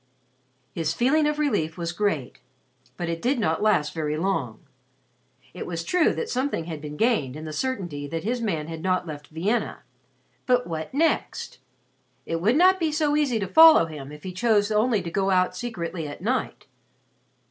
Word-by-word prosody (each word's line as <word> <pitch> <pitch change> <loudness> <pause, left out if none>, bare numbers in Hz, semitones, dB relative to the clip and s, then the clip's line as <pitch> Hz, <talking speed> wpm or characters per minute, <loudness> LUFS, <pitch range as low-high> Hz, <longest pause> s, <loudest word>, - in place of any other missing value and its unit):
His 165 +1 -2
feeling 295 +5 +3
of 300 0 -1
relief 175 - 0
was 170 -1 -3
great, 175 -9 -2 0.6
but 175 - -3
it 165 0 -3
did 260 +3 +1
not 160 -7 0
last 180 -9 +2
very 155 -2 -2
long. 155 - -2 0.9
It - - -6
was 170 -1 -4
true 355 - +2
that 465 - -3
something 255 - -1
had 160 -3 -6
been 150 0 -7
gained 215 - +1
in 155 +1 -7
the 155 - -6
certainty 175 - -3
that 165 +2 -4
his 240 +3 -1
man 165 -9 -1
had 165 -1 -6
not 185 +1 0
left 150 -3 -8
Vienna. 195 +9 -2 0.6
But 250 -1 +3
what 160 -2 -5
next? 310 - -1 0.7
It 165 0 -3
would 220 +7 +3
not 370 +4 +5
be 320 -3 0
so 300 -1 +1
easy 285 -6 +1
to 195 - -2
follow 320 - +8
him 150 -3 -8
if 150 0 -11
he 185 - -6
chose 210 +1 +2
only 215 -1 +2
to 170 - -5
go 195 +1 0
out 185 -1 +2
secretly 175 -7 -4
at 145 - -9
night. 255 +5 -2
185 Hz, 180 wpm, -25 LUFS, 160-250 Hz, 0.9 s, follow